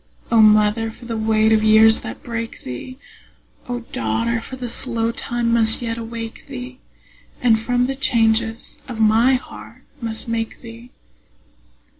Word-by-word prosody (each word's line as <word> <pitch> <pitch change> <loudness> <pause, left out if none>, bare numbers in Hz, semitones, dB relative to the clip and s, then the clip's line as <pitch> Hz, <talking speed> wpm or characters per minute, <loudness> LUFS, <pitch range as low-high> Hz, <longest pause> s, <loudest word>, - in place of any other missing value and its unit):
O 230 -1 +5
mother, 215 +1 +4
for 235 +2 -13
the 230 -1 -4
weight 220 0 +2
of 215 0 +2
years 220 +1 +6
that - - -8
break 230 -1 -6
thee! 190 - -7 0.7
O 245 0 -3
daughter, 230 - -2
for 260 +3 -9
slow 230 -1 -1
time 235 0 -2
must 225 -1 +4
yet 230 -2 -3
awake 230 0 -7
thee, 255 -1 -8 0.6
And 230 -3 +3
from 245 +2 0
the 270 - -2
changes 225 -3 0
of 240 -4 -7
my 225 +4 +4
heart 250 - -9 0.2
must 225 -1 -5
make 230 -1 -3
thee! 230 +1 -12
230 Hz, 145 wpm, -20 LUFS, 220-240 Hz, 0.7 s, years